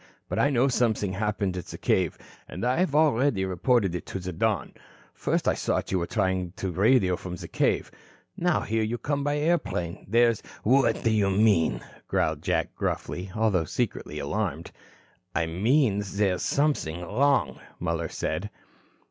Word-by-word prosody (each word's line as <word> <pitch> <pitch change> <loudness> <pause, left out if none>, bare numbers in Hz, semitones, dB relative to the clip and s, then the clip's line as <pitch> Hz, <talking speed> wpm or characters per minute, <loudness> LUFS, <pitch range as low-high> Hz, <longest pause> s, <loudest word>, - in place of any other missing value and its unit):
"But - - -2
I 145 - +4
know 130 -1 +3
something 110 -6 +1
happened 100 -1 -1
at 90 - -5
the - - -7
cave 90 -4 +1 0.3
and - - -4
I 125 +3 +2
have 180 -6 +1
already 140 -9 +3
reported 95 +1 +1
so 90 - -1
to 95 - -6
the 90 0 -5
Don. 105 0 0 0.4
First - - -1
I - - +4
thought - - -1
you 95 - +2
were 85 - -2
trying 95 -2 -1
to 95 -1 -4
radio 95 0 +3
from 90 0 -6
the - - -8
cave. - - 0 0.4
Now 175 -2 +1
here 110 +1 -1
you 110 +2 -1
come 145 +2 -2
by 145 +1 0
airplane. 145 - -1
There's 115 0 +3 0.2
" - - -26
"What 125 0 +3
do 115 - +3
you 105 -3 +2
mean?" 100 -4 +3 0.3
growled - - 0
Jack - - -1
gruffly, 95 +2 -3
although 105 -7 +2
secretly 75 0 -3
alarmed. 85 +1 -3 0.6
"I 85 -1 +2
mean 105 - +2
there's 100 -3 +1
something 140 - 0
wrong," 135 +10 +1 0.2
Muller 85 -1 -2
said. - - -3
105 Hz, 165 wpm, -26 LUFS, 90-125 Hz, 0.6 s, I